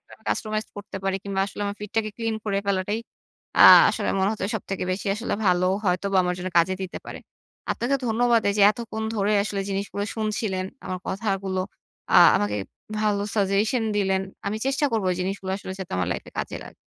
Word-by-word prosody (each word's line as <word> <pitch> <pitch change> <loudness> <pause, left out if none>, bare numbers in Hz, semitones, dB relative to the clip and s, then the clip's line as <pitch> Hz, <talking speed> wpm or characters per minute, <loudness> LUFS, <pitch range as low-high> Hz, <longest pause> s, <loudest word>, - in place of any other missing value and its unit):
আমি - - -16
customized 215 0 -2
করতে 205 -1 -7
পারি 195 0 +1
কিংবা, 195 -1 -2
আসলে 200 - -9
আমার 200 0 -4
ফিডটাকে 215 +1 -2
ক্লিন 225 -1 -2
করে 200 -2 0
ফেলাটাই 200 +2 0 0.6
আ - - +6 0.3
আসলে - - -2
মনে 190 0 +2
হচ্ছে 210 -3 -3
সবথেকে 195 -2 -4
বেশি 190 +3 -4
আসলে 230 +3 -2
ভালো 180 -1 +3 0.2
হয়তোবা 195 +2 +1
আমার 180 0 0
জন্য 185 +1 -3
কাজে 185 +3 +3
দিতে 185 - -5
পারে। - - -7 0.5
আপনাকে 245 +4 0
ধন্যবাদ 235 0 +3
এইযে 200 0 +2
এতক্ষণ 220 -1 -5
ধরে 205 0 +1
আসলে 200 -1 -3
জিনিসগুলো 200 +1 -2
শুনছিলেন, 215 -3 -1 0.2
আমার 185 0 -3
কথাগুলো, 195 -2 -1 0.5
আ - - +3 0.2
আমাকে 105 0 0 0.4
ভালো 210 -2 +1
সাজেশন 210 +4 +1
দিলেন। 190 -1 +1 0.2
আমি 205 +2 -1
চেষ্টা 275 +2 +1
করবো 220 -4 0
এই - - -4
জিনিসগুলো 190 +1 -3
আসলে 190 -1 -7
যাতে 190 - -7
আমার 90 -1 0
লাইফে - - -7
কাজে - - -3
লাগে। - - -12
200 Hz, 180 wpm, -24 LUFS, 190-215 Hz, 0.6 s, আ